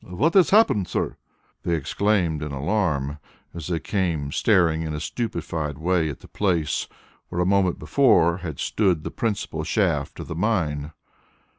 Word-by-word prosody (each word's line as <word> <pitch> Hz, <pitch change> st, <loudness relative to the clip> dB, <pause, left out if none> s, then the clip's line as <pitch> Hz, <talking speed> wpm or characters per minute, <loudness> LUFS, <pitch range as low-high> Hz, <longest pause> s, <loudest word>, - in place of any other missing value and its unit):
"What 130 Hz, -, 0 dB
has 190 Hz, -3 st, +5 dB
happened, 190 Hz, -, +4 dB
sir?" -, -, -2 dB, 0.5 s
they 85 Hz, -, 0 dB
exclaimed 85 Hz, +1 st, 0 dB
in 75 Hz, -1 st, -4 dB
alarm, 75 Hz, -2 st, -1 dB, 0.3 s
as 85 Hz, -3 st, -6 dB
they 85 Hz, -2 st, -1 dB
came 85 Hz, -9 st, -1 dB
staring 85 Hz, -6 st, +3 dB
in 80 Hz, -2 st, -3 dB
a -, -, -3 dB
stupefied 80 Hz, -, -3 dB
way 85 Hz, 0 st, +1 dB
at 70 Hz, -, -7 dB
the -, -, -13 dB
place 85 Hz, -7 st, 0 dB, 0.4 s
where 90 Hz, -, -3 dB
a 90 Hz, -, +2 dB
moment 95 Hz, -1 st, +2 dB
before 85 Hz, -, +3 dB
had 85 Hz, -6 st, -6 dB
stood 90 Hz, -7 st, +1 dB
the -, -, -5 dB
principal 110 Hz, -4 st, -2 dB
shaft -, -, 0 dB
of -, -, -6 dB
the -, -, -4 dB
mine. 80 Hz, -6 st, -1 dB
85 Hz, 160 wpm, -24 LUFS, 75-100 Hz, 0.5 s, has